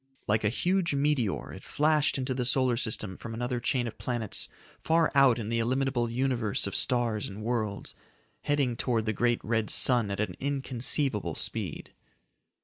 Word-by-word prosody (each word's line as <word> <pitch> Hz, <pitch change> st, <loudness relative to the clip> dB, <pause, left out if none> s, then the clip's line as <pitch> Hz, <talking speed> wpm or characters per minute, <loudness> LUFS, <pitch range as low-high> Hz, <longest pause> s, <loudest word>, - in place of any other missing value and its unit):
Like 110 Hz, +1 st, +2 dB
a 105 Hz, -, +3 dB
huge 175 Hz, -, +1 dB
meteor 140 Hz, -7 st, 0 dB
it -, -, -10 dB
flashed 150 Hz, -1 st, +2 dB
into 130 Hz, 0 st, -2 dB
the 125 Hz, 0 st, -1 dB
solar 125 Hz, 0 st, +2 dB
system 110 Hz, -5 st, -1 dB
from 115 Hz, -1 st, -7 dB
another 120 Hz, +1 st, -2 dB
chain 120 Hz, +1 st, 0 dB
of 115 Hz, -, -7 dB
planets 120 Hz, -4 st, -1 dB, 0.3 s
far 165 Hz, 0 st, +3 dB
out 135 Hz, -4 st, +5 dB
in 110 Hz, -2 st, -4 dB
the 115 Hz, 0 st, 0 dB
illimitable 125 Hz, 0 st, 0 dB
Universe 120 Hz, -3 st, 0 dB
of 100 Hz, -, -3 dB
stars 120 Hz, -4 st, +1 dB
and 105 Hz, +2 st, -8 dB
worlds, 110 Hz, -3 st, -2 dB, 0.5 s
heading 140 Hz, -4 st, +1 dB
towards 115 Hz, -2 st, 0 dB
the 110 Hz, -, 0 dB
great 120 Hz, +1 st, 0 dB
red 110 Hz, -1 st, 0 dB
sun 120 Hz, -5 st, +3 dB
at 100 Hz, -, -3 dB
an 105 Hz, -, -2 dB
inconceivable 130 Hz, -, 0 dB
speed. -, -, -3 dB
120 Hz, 165 wpm, -29 LUFS, 110-135 Hz, 0.5 s, out